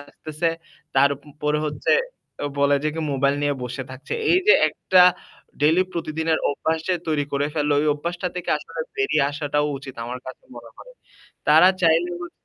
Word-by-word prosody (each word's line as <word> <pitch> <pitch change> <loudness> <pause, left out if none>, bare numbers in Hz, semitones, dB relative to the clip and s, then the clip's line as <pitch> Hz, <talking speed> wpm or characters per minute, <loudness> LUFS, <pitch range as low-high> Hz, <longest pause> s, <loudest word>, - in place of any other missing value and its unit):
আসতেছে। 155 +3 -4
প - - -39 0.3
তারপরে 145 +2 +1
হচ্ছে 145 -2 -1 0.7
বলে 140 0 +4
যে - - +2
কি 160 - -3
মোবাইল 140 +1 +2
নিয়ে 145 0 +1
বসে 125 +2 -5
থাকছে। 130 +2 -6 0.2
এই 360 - +5
যে - - +9
একটা 185 -1 +3 0.6
ডেইলি 160 +5 +4
প্রতিদিনের 160 -1 -1
অভ্যাস 160 +3 -1
যে 185 - +3
তৈরি 150 -2 +1
করে 140 +1 0
ফেলল 150 -1 0
ওই 155 - 0
অভ্যাসটা 170 +4 -4
থেকে 180 - -3
আসলে - - -8 0.2
বেরিয়ে 410 - +2
আসাটাও 145 0 -1
উচিত। 135 -1 -10
আমার 125 +2 -6
কাছে 130 - -10
মনে 120 -1 -11
হয়। - - -13 0.6
তারা 180 - +7
চাইলে 165 +1 +3
হ 175 - -7
150 Hz, 170 wpm, -23 LUFS, 140-165 Hz, 0.7 s, যে